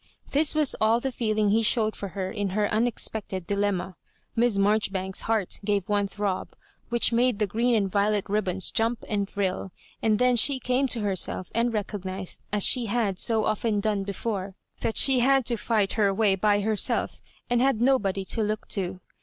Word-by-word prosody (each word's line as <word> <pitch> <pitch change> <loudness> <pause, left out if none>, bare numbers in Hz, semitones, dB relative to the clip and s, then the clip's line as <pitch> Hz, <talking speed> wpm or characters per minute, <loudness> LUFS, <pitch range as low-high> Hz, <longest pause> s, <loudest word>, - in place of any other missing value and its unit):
This 300 +1 +3
was 305 -3 +2
all 220 +2 +3
the 265 +2 -3
feeling 215 -4 0
he 225 +2 +3
showed 220 -1 +2
for 200 - -5
her 190 -1 -3
in 205 -3 -2
her 210 -1 +2
unex 230 +3 +2
pected 190 -4 -6
dilemma. 195 -2 -1 0.4
Miss 235 -3 +2
Marjoribanks's 195 -2 0
heart 220 -4 -1
gave 200 -2 -1
one 205 -1 +1
throb, 200 -2 -3 0.4
which 235 -1 +2
made 245 -1 +2
the 210 - +1
green 235 +5 +1
and 205 -3 +1
violet 205 +1 0
ribbons 190 -3 -1
jump 230 +1 0
and 200 -2 -2
thrill; 190 -1 -3 0.3
and 215 -1 +2
then 250 +1 +3
she 265 +4 +5
came 255 +2 0
to 240 -3 0
herself, 190 -2 -2
and 235 +2 +1
recognised, 195 -3 -4
as 205 -1 +1
she 245 -3 +4
had 205 -4 -1
BO 225 -2 +1
often 215 0 0
done 205 -1 0
before, 195 -1 -4 0.2
that 225 - -2
she 265 -2 +4
had 265 +1 +3
to 240 - +2
fight 215 -3 0
her 205 -3 +2
way 200 0 +2
by 205 +1 +2
herself 215 0 -1 0.3
and 240 0 +1
had 265 -4 +2
nobody 205 -7 +1
to 225 - -1
look 215 0 -2
to. 185 -2 -3
210 Hz, 185 wpm, -26 LUFS, 200-235 Hz, 0.4 s, she